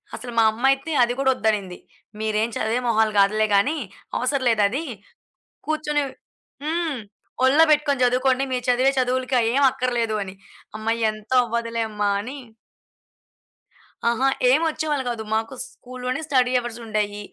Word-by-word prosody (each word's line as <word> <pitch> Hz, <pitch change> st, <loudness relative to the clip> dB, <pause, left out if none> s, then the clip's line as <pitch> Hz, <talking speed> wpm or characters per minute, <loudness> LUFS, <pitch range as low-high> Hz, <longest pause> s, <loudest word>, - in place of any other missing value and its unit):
అసల 245 Hz, -1 st, -7 dB
మా 225 Hz, -, +6 dB
అమ్మైతే 270 Hz, +6 st, +1 dB
అది 240 Hz, 0 st, +1 dB
కూడా 265 Hz, -1 st, +2 dB
వద్దనింది. 200 Hz, -4 st, -1 dB, 0.4 s
"మీరేం 220 Hz, +1 st, 0 dB
చదివే 230 Hz, +3 st, 0 dB
మొహాలు 220 Hz, -1 st, +2 dB
కాదులే 215 Hz, +2 st, +3 dB
గానీ, 285 Hz, +11 st, +2 dB, 0.4 s
అవసరం 260 Hz, +1 st, 0 dB
లేదది. 225 Hz, +7 st, +1 dB, 0.8 s
కూర్చొని" 300 Hz, -1 st, 0 dB, 0.6 s
హ్మ్. 320 Hz, -3 st, -1 dB, 0.5 s
"ఒల్లో 295 Hz, +5 st, +6 dB
పెట్టుకొని 290 Hz, -3 st, +2 dB
చదువుకోండి, 255 Hz, +2 st, +2 dB
మీరు 250 Hz, -1 st, -2 dB
చదివే 260 Hz, +2 st, +3 dB
చదువులకి 255 Hz, +1 st, 0 dB
అయ్యేం 250 Hz, +5 st, +2 dB
అక్కర్లేదు" 240 Hz, -4 st, -1 dB
అని. 190 Hz, 0 st, -9 dB, 0.4 s
అమ్మ 220 Hz, +1 st, -5 dB, 0.2 s
ఎంత 215 Hz, +1 st, -12 dB
అవ్వదులే 230 Hz, 0 st, -2 dB
అమ్మ! 210 Hz, -1 st, -5 dB, 0.2 s
అని 260 Hz, +6 st, -7 dB, 1.7 s
అహా! 255 Hz, +3 st, +1 dB, 0.2 s
ఏం 295 Hz, +5 st, +4 dB
వచ్చేవాళ్ళు 300 Hz, -3 st, -1 dB
గాదు. 225 Hz, -2 st, -4 dB
మాకు 225 Hz, +3 st, -1 dB
స్కూల్లోనే 255 Hz, +3 st, -6 dB
స్టడీ 255 Hz, -4 st, +2 dB
అవర్సుండేయి, 215 Hz, -3 st, -3 dB
245 Hz, 130 wpm, -23 LUFS, 220-270 Hz, 1.7 s, మా